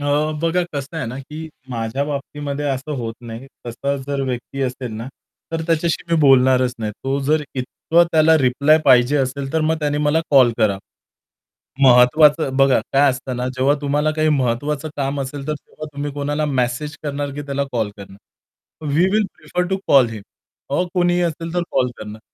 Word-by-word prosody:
अ, 145 - -5 0.4
बघा 165 +2 +2
कसं 145 +3 -5
आहे 155 - -3
ना, 125 +3 -6
की 155 +4 -8 0.2
माझ्या 115 +3 -2
बाबतीमध्ये 145 0 -4
असं 135 +2 -3
होत 115 -3 -4
नाही. 115 +2 -9 0.2
तसा 140 +4 -2
जर 140 -1 -2
व्यक्ती 130 +2 -5
असेल 125 -2 -4
ना, 115 +3 -6 0.4
तर 165 0 -1
त्याच्याशी 165 0 0
मी - - +4
बोलणारच 130 -2 +4
नाही. 110 -2 -3
तो 135 +6 -3
जर 150 +3 +1
इतकं 160 +6 +1
त्याला 160 0 +5
रिप्लाय 140 +3 +3
पाहिजे 130 +1 +5
असेल 135 0 -2
तर 160 - +1
मग 155 +1 +1
त्याने 145 -1 0
मला 150 +2 +2
कॉल 130 -4 +6
करा. 105 -4 +2 1.0
महत्वाचं 135 +3 +5
बघा 135 -3 +4
काय 140 +1 +5
असतं 130 0 -5
ना 125 +1 -2
जेव्हा 135 +3 +3
तुम्हाला 145 +1 +1
काही 155 0 +2
महत्त्वाचं 140 +2 0
काम 140 0 -2
असेल 140 +1 -5
तर - - +1
तेव्हा 155 +1 -10
तुम्ही 145 +1 -3
कोणाला 145 +2 -2
मेसेज 135 +2 -1
करणार 145 -1 -3
की 145 - -5
त्याला 140 -1 -2
कॉल 110 -4 -1
करणार. 100 0 -12 0.8
We 165 +4 +4
will 215 0 +3
prefer 180 0 -2
to 190 - +1
call 130 -4 +6
him 110 -3 -7 0.5
a, 145 +5 +1
कोणीही 175 -1 +2
असेल 165 0 -3
तर 175 - +1
कॉल 130 -2 +2
करणार. 105 0 -8
140 Hz, 180 wpm, -20 LUFS, 125-150 Hz, 1.0 s, कॉल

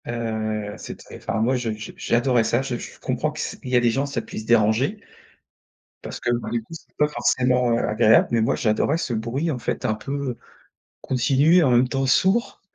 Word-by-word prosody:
Heu, 110 -3 -3
c'est - - -8
t - - -13
enfin, 110 - -3
moi, 125 +4 +2
je 120 -3 -2
je, 110 +1 -8
j'adorais 120 0 +1
ça. 115 +3 +1
Je 135 -2 -3
je - - -10
comprends - - -2
que - - -9
c - - -4
il 125 - -6
y 125 - +1
a - - +6
des 120 -1 +2
gens, 135 +4 0
ça 135 -4 -3
puisse 110 0 -8
déranger 120 - +2 1.0
parce - - -7
que, 120 - -1
bah, 120 0 -2
du 120 - -1
coup, 115 - -14
c'est 165 - -12
pas 150 - +3
forcément, 125 -4 +1
heu, 115 - +2
agréable, 110 +1 +4
mais 115 -1 +2
moi, 110 - +1
j'adorais 115 +7 +1
ce 150 -7 -3
bruit, 120 +9 -2
en 130 - -3
fait, - - -3
un 110 - +2
peu 135 +1 -4 0.6
continu 135 +5 +2
et 175 - +5
en 135 - +3
même 120 +1 +4
temps, 135 +1 -1
sourd. 190 - +2
120 Hz, 220 wpm, -23 LUFS, 115-135 Hz, 1.0 s, a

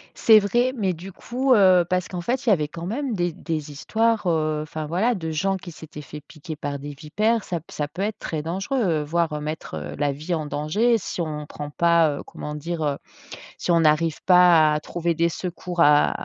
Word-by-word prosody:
C'est 220 -2 +6
vrai. 240 +6 +1
Mais 195 -6 0
du 180 +4 -9
coup, 255 +6 0
heu, 185 -4 +5
parce 185 0 0
qu'en 180 -2 -5
fait 255 +8 -2
il 235 - +2
y - - +6
avait 155 -7 +2
quand 165 +2 -8
même 250 +5 -2
des 175 -2 0
des 155 -2 -5
histoires, 225 +7 0
heu, 155 -2 +1
enfin 155 0 -6
voilà, 195 +10 +1
de 165 -4 -4
gens 190 +5 0
qui 175 -2 -10
s'étaient 155 -1 -10
faits 150 +1 -10
piquer 155 0 -8
par 145 -1 -4
des 145 +1 -7
vipères. 210 +10 0
Ça 175 - -3
p - - -33
ça 150 - -3
peut 165 +6 -7
être 210 +1 -2
très 155 -2 -3
dangereux, 180 - -1
voire 160 0 -1
mettre, 155 - -5
heu, 75 -1 -6
la 145 - +1
vie 155 +6 -4
en 155 -2 -2
danger 200 +12 +1
si 185 -3 -5
on 150 -2 -4
prend 145 0 -7
pas, 165 -2 +3
heu, - - -7
comment 150 0 -7
dire, 165 +1 -4
heu, 145 -2 0 0.6
si - - -1
on 170 - +4
n'arrive 155 +1 +2
pas 175 -4 +6
à 150 - 0
trouver 170 +2 -2
des 170 +1 +2
secours 175 0 -4
à 150 -2 +5
170 Hz, 220 wpm, -23 LUFS, 150-190 Hz, 0.6 s, C'est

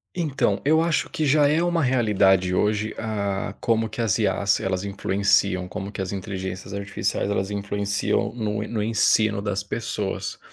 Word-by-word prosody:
Então, 155 -6 0
eu 160 +2 +4
acho 165 -1 +1
que 175 -4 -2
já 145 0 +4
é 155 +3 +2
uma 175 -2 +1
realidade 100 -7 +3
hoje, 105 +2 0
ah, 100 -3 -2
como 115 -2 +1
que 110 +2 -5
as 105 -4 +2
IAs, 100 -1 +1
elas 95 0 -2
influenciam, 100 -1 +1
como 95 +2 -6
que 105 - -5
as 95 0 -3
inteligências 95 0 -5
artificiais 100 0 -2
elas 100 -1 -1
influenciam 100 0 -1
no 105 -3 -2
no 110 -2 -2
ensino 110 -1 +2
das 100 -1 -2
pessoas. 105 -1 -4
105 Hz, 160 wpm, -24 LUFS, 100-115 Hz, -, eu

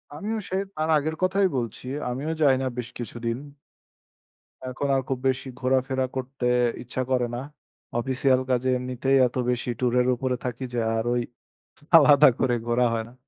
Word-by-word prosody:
আমিও 215 +8 -3
সে 185 - -2 0.2
তাঁর 155 +1 -1
আগের 155 +2 -2
কথাই 190 +1 +3
বলছি, 120 +1 -4 0.2
আমিও 140 +6 -3
যাই 140 -3 +5
না 130 - -1
বেশ 120 -1 -4
কিছুদিন। 115 0 -4 1.3
এখন 130 +2 -3
আর 135 - +2
খুব 130 - -1
বেশি 130 +1 -1
ঘোরাফেরা 130 0 +1
করতে 130 -1 -4 0.4
ইচ্ছা 125 +1 -4
করে 125 -1 +2
না। - - -3 0.6
অফিসিয়াল 130 +1 +2
কাজে 130 0 +1
এমনিতেই 130 +2 0
এত 125 - -12
বেশি 125 0 -1
ট্যুরের 125 0 +2
উপরে 130 0 -1
থাকি 125 +1 -4
যে, 120 - 0 0.2
আর 110 - 0
ওই 120 - +1 0.8
আলাদা 145 -2 +7
করে 125 -2 +2
ঘোরা 120 +1 +2
হয় 115 -1 -2
না। - - -17
130 Hz, 165 wpm, -25 LUFS, 125-135 Hz, 1.3 s, আলাদা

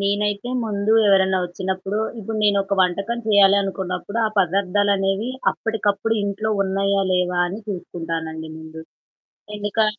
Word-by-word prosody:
నేనైతే 205 +3 -1
ముందు 210 0 0
ఎవరైనా 190 -1 +4
వచ్చినప్పుడు 190 +3 -3 0.2
ఇప్పుడు 220 +1 -5
నేనొక 200 -1 +2
వంటకం 200 +6 0
చేయాలనుకున్నప్పుడు 200 0 +2
ఆ - - 0
పదార్థాలనేవి 195 +3 +1 0.2
అప్పటికప్పుడు 225 0 -1
ఇంట్లో 205 +2 -2
ఉన్నాయా 195 +1 +1
లేవా? 180 -1 +1
అని 200 +5 -6
చూసుకుంటానండి 165 -3 -5
ముందు. 160 0 -10 0.8
ఎందుకా 205 +1 +1
195 Hz, 110 wpm, -22 LUFS, 185-205 Hz, 0.8 s, ఎవరైనా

